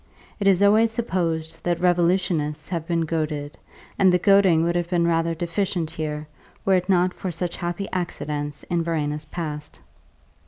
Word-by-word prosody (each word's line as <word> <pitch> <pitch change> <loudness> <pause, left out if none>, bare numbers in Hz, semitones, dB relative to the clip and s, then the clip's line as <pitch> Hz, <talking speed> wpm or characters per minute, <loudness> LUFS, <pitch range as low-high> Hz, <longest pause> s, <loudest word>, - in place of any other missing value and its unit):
It 200 - +1
is 195 0 +4
always 215 +3 +5
supposed 165 -8 -2
that 175 -1 0
revolutionists 175 -3 +1
have 165 -3 -3
been 170 -1 +1
goaded, 150 -2 -2 0.4
and 190 -2 +6
the 180 - +4
goading 190 -3 +4
would 170 +1 0
have 175 -1 -1
been 175 -2 +2
rather 165 0 +1
deficient 170 -1 -2
here 155 -2 -4 0.4
were 195 - +3
it 180 0 +1
not 180 -1 +3
for 190 - -5
such 175 0 -3
happy 175 +2 -3
accidents 150 -5 -3
in 175 -1 -1
Verena's 150 -2 -2
past. 150 -3 -6
170 Hz, 160 wpm, -24 LUFS, 160-180 Hz, 0.4 s, and